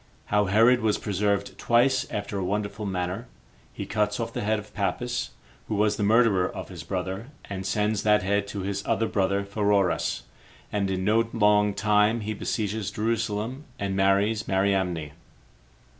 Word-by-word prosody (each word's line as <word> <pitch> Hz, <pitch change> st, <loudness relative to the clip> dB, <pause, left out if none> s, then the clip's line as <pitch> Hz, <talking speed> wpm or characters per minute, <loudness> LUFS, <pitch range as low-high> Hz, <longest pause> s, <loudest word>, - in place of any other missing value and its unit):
How 105 Hz, 0 st, +4 dB
Herod 115 Hz, +6 st, +5 dB
Was 110 Hz, -1 st, +2 dB
Preserved 100 Hz, 0 st, -1 dB
Twice 130 Hz, +2 st, +3 dB
After 100 Hz, -1 st, -3 dB
A -, -, -2 dB
Wonderful 105 Hz, +2 st, -2 dB
Manner. 95 Hz, +5 st, -3 dB, 0.4 s
He -, -, -6 dB
Cuts 105 Hz, 0 st, 0 dB
Off 115 Hz, -, -3 dB
The 120 Hz, -, -3 dB
Head 110 Hz, +1 st, +1 dB
Of 105 Hz, 0 st, -9 dB
Pappus, 120 Hz, +4 st, -2 dB, 0.4 s
Who 110 Hz, -, -2 dB
Was 105 Hz, 0 st, +2 dB
The -, -, -3 dB
Murderer 105 Hz, -3 st, +4 dB
Of -, -, -7 dB
His -, -, -8 dB
Brother 95 Hz, +4 st, -4 dB, 0.2 s
And 95 Hz, -1 st, -4 dB
Sends 105 Hz, +1 st, 0 dB
That 105 Hz, -1 st, +3 dB
Head 100 Hz, +1 st, 0 dB
To 100 Hz, 0 st, -5 dB
[His 100 Hz, +1 st, -3 dB
Other 115 Hz, -, +2 dB
Brother] 100 Hz, 0 st, 0 dB
Pheroras, 100 Hz, -2 st, +1 dB, 0.5 s
And 100 Hz, -2 st, 0 dB
In 95 Hz, -1 st, -1 dB
No 115 Hz, +2 st, +3 dB
Long 105 Hz, -2 st, +3 dB
Time 105 Hz, +2 st, +3 dB
He 110 Hz, +1 st, -3 dB
Besieges 105 Hz, -1 st, -2 dB
Jerusalem 115 Hz, +4 st, -2 dB
And 100 Hz, -1 st, -2 dB
Marries 100 Hz, +3 st, +2 dB
Mariamne. 95 Hz, -5 st, 0 dB
105 Hz, 160 wpm, -26 LUFS, 100-110 Hz, 0.5 s, Herod